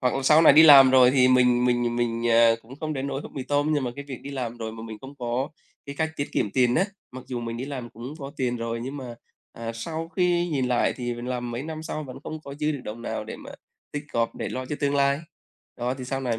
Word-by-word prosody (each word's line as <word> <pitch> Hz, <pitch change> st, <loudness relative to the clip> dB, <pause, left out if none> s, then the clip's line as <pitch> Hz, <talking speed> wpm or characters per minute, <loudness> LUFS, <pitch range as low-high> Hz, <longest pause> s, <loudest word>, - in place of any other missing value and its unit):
hoặc 125 Hz, -2 st, +1 dB
là 135 Hz, -, -1 dB
sau 155 Hz, +4 st, +6 dB
này -, -, +8 dB
đi 160 Hz, -, +8 dB
làm 135 Hz, -4 st, +9 dB
rồi 130 Hz, -1 st, +7 dB
thì 130 Hz, -1 st, +4 dB
mình 125 Hz, -1 st, +4 dB
mình 120 Hz, -1 st, +1 dB
mình, 120 Hz, -1 st, -1 dB
ờ, 115 Hz, 0 st, +5 dB
cũng 125 Hz, +4 st, -13 dB
không 155 Hz, -1 st, -2 dB
đến 135 Hz, -1 st, -3 dB
nỗi 135 Hz, 0 st, -3 dB
húp -, -, -10 dB
mì 135 Hz, -, -4 dB
tôm 145 Hz, +3 st, +1 dB
nhưng 140 Hz, -3 st, 0 dB
mà 120 Hz, -, -2 dB
cái 140 Hz, -, -6 dB
việc 130 Hz, -, -6 dB
đi 140 Hz, -, -7 dB
làm 120 Hz, -4 st, -4 dB
rồi 110 Hz, -1 st, -5 dB
mà 110 Hz, -, -9 dB
mình 110 Hz, -1 st, -8 dB
không 135 Hz, +2 st, -10 dB
có 125 Hz, +3 st, -2 dB, 0.4 s
cái 140 Hz, -, -6 dB
cách 160 Hz, 0 st, 0 dB
tiết 140 Hz, -, -2 dB
kiệm 105 Hz, -, 0 dB
tiền 125 Hz, 0 st, +2 dB
á, 185 Hz, -, +3 dB, 0.3 s
mặc 130 Hz, 0 st, -9 dB
dù 125 Hz, -2 st, -4 dB
mình 115 Hz, 0 st, -4 dB
đi 125 Hz, -, -4 dB
làm 130 Hz, -4 st, -6 dB
cũng 125 Hz, +6 st, -8 dB
có 140 Hz, 0 st, -7 dB
tiền 125 Hz, -2 st, -1 dB
rồi, 115 Hz, 0 st, -3 dB
nhưng 135 Hz, +3 st, -5 dB
mà, 125 Hz, -3 st, -7 dB, 0.4 s
à, 115 Hz, 0 st, -6 dB
sau 160 Hz, +7 st, -5 dB
khi 175 Hz, -1 st, +1 dB
nhìn 135 Hz, -5 st, 0 dB
lại 125 Hz, -, +2 dB
thì 120 Hz, -2 st, -3 dB
mình 120 Hz, +1 st, -7 dB
làm 125 Hz, -1 st, -3 dB
mấy 120 Hz, +3 st, -4 dB
năm 155 Hz, 0 st, -6 dB
sau 155 Hz, -1 st, -5 dB
vẫn 130 Hz, 0 st, -9 dB
không 155 Hz, 0 st, -6 dB
có 140 Hz, -2 st, -9 dB
dư 150 Hz, +1 st, -1 dB
được 140 Hz, -, -5 dB
đồng 115 Hz, +2 st, -7 dB
nào -, -, -4 dB
để -, -, -7 dB
mà -, -, -11 dB, 0.4 s
tích 145 Hz, 0 st, -4 dB
góp 115 Hz, 0 st, 0 dB
để -, -, -4 dB
lo 130 Hz, -, -4 dB
cho 150 Hz, -, -4 dB
tương 140 Hz, 0 st, +1 dB
lai. 140 Hz, 0 st, +2 dB, 0.6 s
Đó, 125 Hz, +1 st, -2 dB
thì 130 Hz, -1 st, -7 dB
sau 135 Hz, +1 st, -3 dB
này 120 Hz, -4 st, -1 dB
130 Hz, 285 wpm, -25 LUFS, 120-140 Hz, 0.6 s, làm